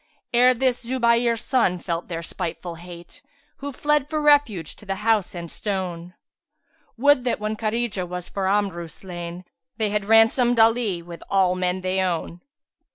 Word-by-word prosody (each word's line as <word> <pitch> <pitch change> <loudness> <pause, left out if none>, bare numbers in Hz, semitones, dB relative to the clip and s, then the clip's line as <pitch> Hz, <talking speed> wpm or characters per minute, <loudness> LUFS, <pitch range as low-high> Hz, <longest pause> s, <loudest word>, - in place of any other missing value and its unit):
Ere 250 +1 +5
this 255 0 0
Zubayr 235 -1 +2
son[FN#368] 220 -8 0
felt 170 -1 -3
their 170 -1 -5
spiteful 170 +1 -5
hate, 175 - -12 0.2
* - - -38
Who 285 +1 -5
fled 295 +1 0
for 310 - -1
refuge 290 - +3
to 210 - -16
the 195 - -1
House 215 -5 +2
and 170 -1 -6
Stone: 180 -4 -4 0.8
Would 285 +1 +4
that 245 - 0
when 215 +1 -2
Khárijah 215 -4 -2
was 180 0 -5
for 195 -1 -2
Amru 195 -4 0
slain[FN#369] 175 +1 -8 0.2
* 165 +5 -57
They 215 -3 0
had 210 -1 -1
ransomed 225 +2 +4
Ali 225 -6 +3
with 170 0 -10
all 190 -2 +3
men 185 0 -1
they 185 +1 0
own." 175 -1 -2
200 Hz, 165 wpm, -23 LUFS, 175-235 Hz, 0.8 s, Ere